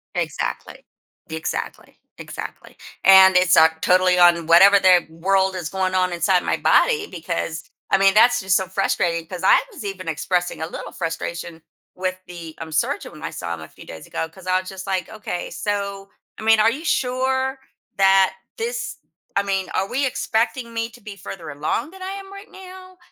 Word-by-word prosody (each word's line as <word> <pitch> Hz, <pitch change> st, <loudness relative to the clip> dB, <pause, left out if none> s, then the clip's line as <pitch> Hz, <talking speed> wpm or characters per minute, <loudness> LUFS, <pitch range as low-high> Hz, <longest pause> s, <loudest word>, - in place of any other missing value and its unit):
Exactly, -, -, -4 dB, 0.4 s
exactly, 160 Hz, 0 st, -5 dB, 0.2 s
exactly. -, -, -9 dB, 0.3 s
And 190 Hz, -1 st, +8 dB
it's, 185 Hz, 0 st, +4 dB
uh, 160 Hz, -, +8 dB
totally 185 Hz, 0 st, +3 dB
on 175 Hz, -2 st, +5 dB
whatever 195 Hz, +4 st, +7 dB
the 185 Hz, -2 st, +5 dB
world 190 Hz, +3 st, +1 dB
is 175 Hz, -4 st, -4 dB
going 185 Hz, -1 st, -1 dB
on 185 Hz, -1 st, +1 dB
inside 175 Hz, +2 st, +2 dB
my -, -, 0 dB
body 445 Hz, -4 st, +3 dB
because 165 Hz, -1 st, -4 dB, 0.3 s
I -, -, +4 dB
mean, 195 Hz, 0 st, +4 dB
that's 245 Hz, +4 st, +5 dB
just 190 Hz, -1 st, +2 dB
so 190 Hz, -, -2 dB
frustrating, 175 Hz, -3 st, -1 dB
'cause 180 Hz, 0 st, -7 dB
I -, -, +6 dB
was 290 Hz, -, -10 dB
even 185 Hz, -4 st, -5 dB
expressing 180 Hz, +2 st, -2 dB
a 160 Hz, -, -2 dB
little -, -, -8 dB
frustration 165 Hz, -1 st, -5 dB, 0.3 s
with 185 Hz, 0 st, -3 dB
the, 170 Hz, -3 st, -9 dB
um, 160 Hz, -1 st, -8 dB
surgeon -, -, -1 dB
when 155 Hz, +1 st, -12 dB
I -, -, -3 dB
saw 85 Hz, -1 st, -5 dB
him 80 Hz, -, -7 dB
a 80 Hz, -, -10 dB
few -, -, -15 dB
days 80 Hz, -, -10 dB
ago 160 Hz, -, -3 dB
'cause 185 Hz, +2 st, -16 dB
I 185 Hz, 0 st, +2 dB
was 185 Hz, -, -10 dB
just 190 Hz, 0 st, -8 dB
like, 185 Hz, -3 st, -1 dB
"Okay, 210 Hz, -5 st, -6 dB
so, 200 Hz, -1 st, -4 dB, 0.3 s
I -, -, -10 dB
mean, 220 Hz, 0 st, +4 dB
are 220 Hz, -, +5 dB
you 300 Hz, +6 st, -6 dB
sure 260 Hz, 0 st, 0 dB, 0.4 s
that 195 Hz, -1 st, +4 dB, 0.2 s
this 475 Hz, +2 st, -4 dB, 0.4 s
I 200 Hz, -, +2 dB
mean, 195 Hz, -1 st, -2 dB
are 195 Hz, -, -1 dB
we 270 Hz, +6 st, -1 dB
expecting 235 Hz, -1 st, -1 dB
me 230 Hz, 0 st, -2 dB
to 240 Hz, +1 st, -17 dB
be 205 Hz, -2 st, -10 dB
further 170 Hz, -5 st, -8 dB
along 155 Hz, -, -3 dB
than 380 Hz, 0 st, -14 dB
I 375 Hz, -, -5 dB
am 390 Hz, 0 st, -9 dB
right 395 Hz, +1 st, -11 dB
now?" 370 Hz, 0 st, -13 dB
190 Hz, 190 wpm, -21 LUFS, 175-225 Hz, 0.4 s, And